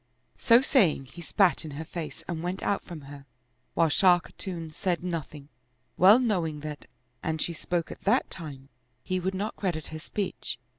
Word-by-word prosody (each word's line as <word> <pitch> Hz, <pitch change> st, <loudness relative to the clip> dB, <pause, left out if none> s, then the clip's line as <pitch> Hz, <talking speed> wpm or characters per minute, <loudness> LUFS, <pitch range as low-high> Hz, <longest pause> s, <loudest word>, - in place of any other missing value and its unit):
So 235 Hz, +2 st, +6 dB
saying, 185 Hz, -, +3 dB
he 175 Hz, -, -9 dB
spat 185 Hz, +2 st, +3 dB
in 155 Hz, -, -6 dB
her 160 Hz, -, -5 dB
face 165 Hz, -1 st, -6 dB
and 170 Hz, -3 st, -3 dB
went 180 Hz, +2 st, -3 dB
out 200 Hz, -, +1 dB
from 170 Hz, -4 st, -8 dB
her; 140 Hz, 0 st, -11 dB, 0.5 s
while 165 Hz, 0 st, +4 dB
Shah 180 Hz, +4 st, +6 dB
Khatun 170 Hz, -2 st, -7 dB
said 180 Hz, +1 st, -1 dB
nothing, 155 Hz, -5 st, -5 dB, 0.5 s
well 195 Hz, +5 st, +8 dB
knowing 175 Hz, -11 st, 0 dB
that, 150 Hz, -1 st, -7 dB, 0.3 s
an 160 Hz, 0 st, -1 dB
she 170 Hz, +2 st, -1 dB
spoke 170 Hz, +1 st, -2 dB
at -, -, -9 dB
that 235 Hz, +6 st, +2 dB
time, 140 Hz, -5 st, -8 dB, 0.3 s
he 185 Hz, 0 st, -1 dB
would 190 Hz, +2 st, -2 dB
not 205 Hz, +3 st, -2 dB
credit 170 Hz, -6 st, -2 dB
her 155 Hz, -, -6 dB
speech. 195 Hz, +4 st, -3 dB
170 Hz, 180 wpm, -28 LUFS, 155-190 Hz, 0.5 s, well